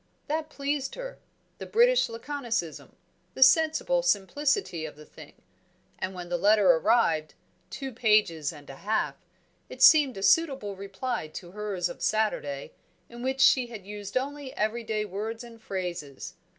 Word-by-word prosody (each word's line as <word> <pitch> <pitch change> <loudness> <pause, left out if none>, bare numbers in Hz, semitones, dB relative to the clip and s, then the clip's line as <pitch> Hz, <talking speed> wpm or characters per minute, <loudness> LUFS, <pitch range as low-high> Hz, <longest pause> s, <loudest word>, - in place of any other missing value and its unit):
That 310 +1 -2
pleased 280 -2 -3
her; - - -7 0.4
the - - -7
British - - +4
laconicism; 230 - -4 0.4
the 265 - +6
sensible 320 - +4
simplicity 285 - 0
of 155 - -7
the 150 +1 -14
thing! - - -14 0.7
And 185 0 -4
when 180 -1 -7
the 175 0 -2
letter 205 -1 +5
arrived 165 -3 +2 0.3
(two 270 -2 -6
pages 210 - +2
and 145 -3 -13
a 135 - -11
half) 215 +2 -1 0.5
it - - -2
seemed 290 -7 +7
a 195 - -5
suitable 265 -3 +2
reply 195 +1 -4
to 175 +3 -10
hers 205 -3 -2
of - - -9
Saturday, 150 -11 -1 0.4
in 240 0 -10
which 265 +1 -1
she 255 -1 +5
had 220 -5 -10
used 205 +1 -5
only 280 +1 -4
everyday 215 0 -1
words 215 +4 -5
and 230 -1 -13
phrases. 175 -9 -5
220 Hz, 150 wpm, -27 LUFS, 185-270 Hz, 0.7 s, seemed